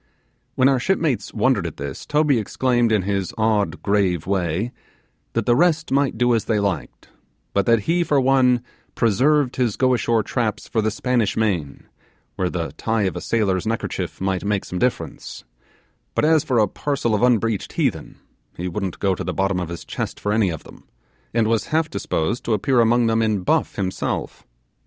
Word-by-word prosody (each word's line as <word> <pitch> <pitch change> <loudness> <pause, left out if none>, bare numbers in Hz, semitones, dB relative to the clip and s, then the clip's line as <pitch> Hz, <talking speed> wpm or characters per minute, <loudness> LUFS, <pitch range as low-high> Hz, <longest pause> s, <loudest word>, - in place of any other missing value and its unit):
When 130 - +4
our 135 -2 +3
shipmates 160 -4 0
wondered - - +1
at - - -8
this, 70 -1 -6
Toby 150 -4 +2
exclaimed 120 +2 +1
in 105 -4 +2
his 100 -1 -2
odd 110 -2 0
grave 100 -5 +1
way 95 +3 -1 0.6
that 115 -2 -1
the 120 - +4
rest 165 +1 +2
might 135 -3 +1
do, 120 +1 +3
as 115 - 0
they 110 -2 +1
liked, 100 -3 -3 0.4
but 100 -1 +1
that 115 -2 +4
he 170 - +1
for 145 -4 +2
one 130 -2 +3 0.3
preserved 130 +5 +2
his 120 -5 +1
go 130 -1 +3
ashore 115 -2 +1
traps 115 -1 -2
for 110 - 0
the 110 - +1
Spanish 115 -1 0
main, 90 -11 -1 0.5
where 95 -2 -1
the 85 -2 -3
tie 110 -1 0
of 95 - -1
a - - -4
sailor's 100 -4 0
neckerchief 115 0 -3
might 95 -1 -1
make 100 -1 -1
some 90 - -4
difference; 125 0 -3 0.7
but - - +2
as 155 -1 +4
for 130 -6 0
a 105 -2 +4
parcel 135 +1 -2
of 105 - +1
unbreeched 115 -4 +1
heathen, - - -2 0.4
he 90 - -3
wouldn't 95 0 -3
go 95 -1 +1
to - - -4
the - - -4
bottom 95 -1 0
of 90 -2 -4
his 85 - -7
chest - - -4
for 105 - -1
any 105 -3 +2
of 80 -3 -5
them, - - -15 0.5
and 115 -1 +1
was 115 -2 +1
half 155 0 0
disposed 80 +10 -2
to 115 - 0
appear 125 +5 +1
among 120 +1 +3
them 115 0 +2
in 110 -3 +1
buff - - +1
himself. 95 -1 -3
110 Hz, 190 wpm, -22 LUFS, 100-125 Hz, 0.7 s, When